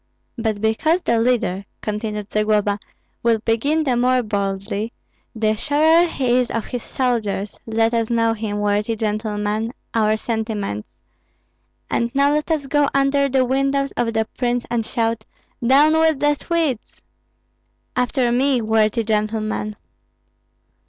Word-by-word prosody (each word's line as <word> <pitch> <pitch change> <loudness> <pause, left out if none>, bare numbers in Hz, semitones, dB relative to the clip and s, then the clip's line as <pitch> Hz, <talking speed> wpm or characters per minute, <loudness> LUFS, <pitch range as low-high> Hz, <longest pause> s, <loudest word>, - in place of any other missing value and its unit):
"But 220 -4 -2
because 310 +11 +2
the 235 - +2
leader," 230 -5 +1 0.2
continued 210 -1 -4
Zagloba, 210 -1 +1 0.4
"will 230 -1 +3
begin 230 +9 +1
the 260 -4 +1
more 250 +1 +2
boldly, 200 +1 -2 0.4
the 220 -1 +1
surer 315 +7 +3
he 255 -6 +1
is 250 - 0
of 230 - -2
his 245 - -4
soldiers, 220 -7 -2
let 225 +1 +1
us 230 -1 +1
show 230 -1 +2
him, 210 -2 -3
worthy 210 +2 0
gentlemen, 215 +1 -2 0.2
our 215 -1 +2
sentiments. 215 - -4 0.9
And 235 - 0
now 280 +1 +4
let 300 +1 -1
us 310 -3 0
go 290 +1 +2
under 275 0 +3
the 260 -1 +2
windows 275 +2 0
of 230 -1 0
the 220 0 +2
prince 245 -1 0
and 235 -1 +1
shout, 230 -1 -1 0.4
'Down 280 +6 +5
with 320 -3 +3
the 295 0 +3
Swedes!' 305 -5 -2 0.9
After 250 0 +1
me, 260 +1 +2
worthy 220 0 +2
gentlemen!" 215 0 -1
230 Hz, 135 wpm, -21 LUFS, 215-265 Hz, 0.9 s, Down